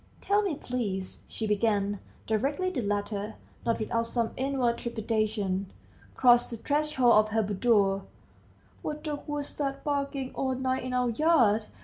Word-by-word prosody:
"Tell 410 +1 +2
me, 390 -7 -1
please," 205 -9 -3
she 220 - -4
began, 205 -1 +1 0.3
directly 280 - 0
the 270 - -2
latter, 205 0 -2 0.3
not 230 - +2
without 230 +1 -1
some 230 -1 0
inward 260 -3 0
trepidation, 215 -4 -1 0.4
crossed 245 -1 +5
the 235 - -5
threshold 285 -2 +2
of 215 0 +5
her 220 +1 +1
boudoir, 200 -1 +2 0.8
"what 300 0 -4
dog 295 -2 -3
was 295 -1 -2
that 275 -2 -2
barking 280 -2 -2
all 260 -1 -1
night 260 0 -1
in 255 0 -4
our 250 -1 +2
yard? 230 -7 +3
235 Hz, 145 wpm, -28 LUFS, 210-275 Hz, 0.8 s, crossed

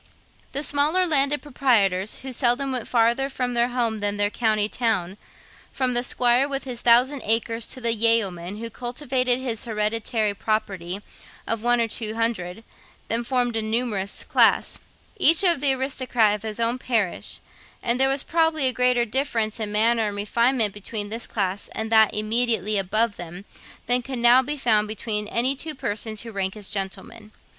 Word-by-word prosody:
The 280 +2 0
smaller 300 +6 +3
landed 290 -3 +2
proprietors, 215 -9 +1
who 265 -1 -6
seldom 255 +2 +1
went 250 -3 -3
farther 240 +3 +1
from 250 -2 -3
home 235 -2 0
than 205 0 -1
their 205 0 +1
county 215 -3 +1
town, 215 -6 -1 0.6
from 255 -2 -1
the 240 - +3
squire 245 +2 +2
with 275 -1 -3
his 245 -3 -4
thousand 250 +4 +4
acres 225 +1 -1
to - - -7
the 235 -2 0
yeoman 205 -5 0
who 230 +1 -6
cultivated 250 +1 -1
his 245 -4 -2
hereditary 215 -1 -1
property 195 -3 -3 0.4
of 230 -1 -2
one 240 +1 +2
or 230 - +1
two 220 -1 -5
hundred, 225 -4 -2 0.5
then 230 +1 +1
formed 245 -1 0
a 225 - -1
numerous 215 -3 -2
class - - +2 0.4
each 330 -3 +5
the 330 -7 +4
aristocrat 255 -5 +1
of 210 - -4
his 220 0 -5
own 235 +2 +1
parish; 225 -8 -2 0.4
and 235 +2 +1
there 265 0 +4
was 270 0 0
probably 320 -3 +1
a 255 - +1
greater 250 -1 +2
difference 230 -3 -2
in 215 -2 -3
manners 225 +1 +2
and 205 - -4
refinement 225 +1 +1
between 205 0 -4
this 225 +2 -5
class 195 -2 -3
and 220 0 -4
that 220 -1 +5
immediately 215 -1 0
above 215 +3 0
them 175 +3 -9 0.4
than 245 +1 +3
could 260 +1 -6
now 240 +2 +6
be 295 +3 -4
found 215 -5 +2
between 210 0 -2
any 250 +5 0
two 310 +2 -5
persons 215 -2 -3
who 230 - -8
rank 195 -1 -3
as 205 -2 -7
gentlemen. 205 +2 -6
230 Hz, 170 wpm, -23 LUFS, 210-255 Hz, 0.6 s, now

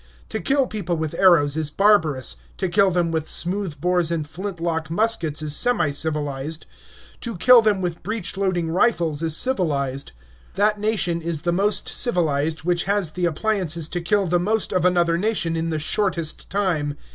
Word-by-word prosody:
To - - -4
kill 270 +8 +2
people 190 -8 -3
with 160 -1 -3
arrows 165 -6 +4
is 155 -2 -1
barbarous; 160 -7 +2 0.2
to 190 - -1
kill 195 +2 +3
them 175 -2 0
with 160 -1 -3
smooth 180 -4 -2
bores 175 0 +1
and 160 -3 -2
flintlock 165 -2 -4
muskets 170 -6 0
is 150 -1 0
semi 245 -11 +2
civilized; 150 0 -3 0.5
to 230 -5 -6
kill 250 +5 +7
them 210 -3 +1
with 175 -2 -4
breech 215 -3 -3
loading 180 -4 -1
rifles 170 -6 +1
is 165 -1 0
civilized. 140 - -1 0.4
That 210 +1 +1
nation 195 -6 0
is 165 -2 -3
the 175 - +1
most 200 +4 +1
civilized 160 - +1
which 175 0 0
has 200 -4 0
the 180 +2 -2
appliances 170 -2 0
to 175 - -3
kill 200 +4 +1
the 175 0 +1
most 215 +4 -1
of 185 -1 +1
another 170 -2 +2
nation 195 -5 0
in 165 0 -2
the 160 - -2
shortest 170 0 -1
time. 165 -8 -1
175 Hz, 170 wpm, -22 LUFS, 160-200 Hz, 0.5 s, kill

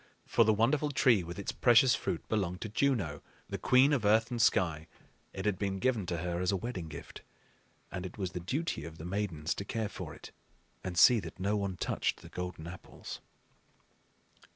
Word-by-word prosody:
For - - +4
the 110 - +4
wonderful 125 +8 +2
tree 120 -8 +4
with 85 +2 -7
its 100 - -3
precious 120 +1 +5
fruit 85 - -3
belonged 90 -4 -1
to 110 - -4
Juno, 105 - 0 0.3
the - - -4
queen 130 +3 +5
of 130 -6 +1
earth 110 +3 +3
and 120 -1 -1
sky; 80 -6 +2 0.4
it 95 - -6
had 105 -3 0
been 100 -1 -1
given 110 -3 0
to 85 - -1
her 85 +1 -2
as 90 - +1
a 100 - +1
wedding 105 -5 -5
gift, 75 -2 -9 0.7
and 90 - -4
it 95 +2 -7
was 95 -3 -3
the 90 - -4
duty 130 - -2
of 80 +1 -9
the 80 - -8
Maidens 90 -4 -2
to - - -5
care 110 +1 -2
for - - -7
it - - -12 0.5
and 90 -2 -4
see 120 +6 +7
that 90 -2 -9
no 100 +3 +1
one 100 -3 -2
touched - - -1
the - - -11
golden 90 -3 -6
apples. 90 +2 -9
100 Hz, 200 wpm, -31 LUFS, 90-115 Hz, 0.7 s, see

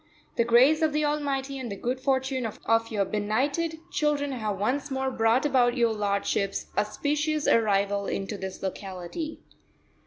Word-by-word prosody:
the 235 - +3
grace 255 +7 +5
of 315 -2 +2
the 300 0 +1
Almighty 280 -2 -1
and 245 -4 -5
the - - -3
good 250 +5 -2
fortune 265 -2 0
of 215 - -9 0.3
your 205 -2 +1
benighted 270 - -1
children 295 -3 0
have 215 -6 -2
once 265 +8 -1
more 265 -1 -1
brought 230 +3 +2
about 255 -3 +3
your 235 -2 +3
lordship's 200 -1 -1
auspicious 295 +8 0
arrival 200 -2 +2
into 195 +2 -3
this 190 -1 -7
locality." 190 - -5
250 Hz, 150 wpm, -27 LUFS, 210-285 Hz, 0.3 s, grace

